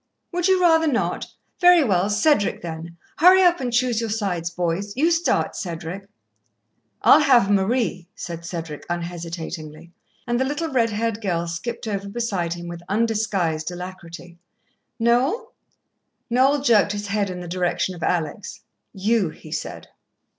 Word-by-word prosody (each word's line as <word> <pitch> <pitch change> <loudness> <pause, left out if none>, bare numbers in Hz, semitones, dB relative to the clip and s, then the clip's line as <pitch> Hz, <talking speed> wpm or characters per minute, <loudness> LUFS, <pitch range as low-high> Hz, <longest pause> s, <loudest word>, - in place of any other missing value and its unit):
"Would 355 0 0
you 375 -1 +4
rather 325 -2 +4
not? 255 -5 -1 0.3
Very 355 -2 +7
well. 195 -5 +1
Cedric, 210 - +2
then. 165 0 -7 0.2
Hurry 370 +3 +7
up 350 -1 +4
and 250 -2 -2
choose 240 -1 +1
your 230 - -2
sides, 195 -6 -2
boys. 180 +5 -3
You 325 +5 +3
start, 330 +1 +1
Cedric." 175 +2 -6 1.0
"I'll - - +8
have 250 -9 +4
Marie," 200 -2 0
said 170 -1 -7
Cedric 165 -3 -6
unhesitatingly, 170 -2 -6 0.3
and 240 0 0
the - - +3
little 295 +5 -2
red 235 -4 +2
haired 225 0 -2
girl 170 -5 -1
skipped 200 +8 -5
over 200 -1 -3
beside 200 -7 -2
him 175 0 -8
with 170 0 -7
undisguised 200 -7 0
alacrity. 175 -1 -9 0.6
"Noel?" 260 - +1 0.8
Noel 270 +3 +3
jerked 215 -5 +4
his 205 0 -4
head 200 -1 -1
in 180 -1 -5
the 175 - -7
direction 180 +1 -1
of 175 - -11
Alex. 175 +4 -2 0.3
"You," 200 -1 +1
he 155 0 -13
said. 155 - -5
200 Hz, 145 wpm, -23 LUFS, 170-245 Hz, 1.0 s, I'll